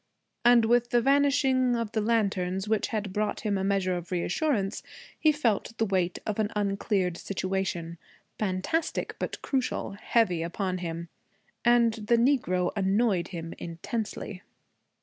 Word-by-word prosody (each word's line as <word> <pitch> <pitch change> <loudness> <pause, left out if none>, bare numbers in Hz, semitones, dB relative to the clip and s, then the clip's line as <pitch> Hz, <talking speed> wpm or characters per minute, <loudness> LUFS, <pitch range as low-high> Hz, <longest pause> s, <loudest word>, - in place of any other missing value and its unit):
And 240 -1 +6
with 240 +1 +3
the 240 - +4
vanishing 270 -1 +3
of 230 -2 -2
the 220 - 0
lantern 200 -5 +1
which 220 -1 +1
had 210 -4 -3
brought 210 +1 -1
him 210 -2 0
a 190 - -1
measure 195 -2 +1
of 175 0 -6
reassurance 195 - 0 0.4
he 310 - +5
felt 230 -6 -1
the 225 - +2
weight 185 -3 0
of 215 0 -2
an 210 -1 +1
uncleared 195 -3 0
situation, 185 -3 -3 0.4
fantastic 210 - -1
but - - -3
crucial, 260 -6 -1
heavy 200 -3 +1
upon 185 +2 -2
him. 170 -1 -5 0.5
And 235 -1 +4
the 225 +1 +1
Negro 230 -9 +2
annoyed 195 -1 +2
him 165 -2 -6
intensely. 190 +3 -5
205 Hz, 140 wpm, -28 LUFS, 185-235 Hz, 0.5 s, And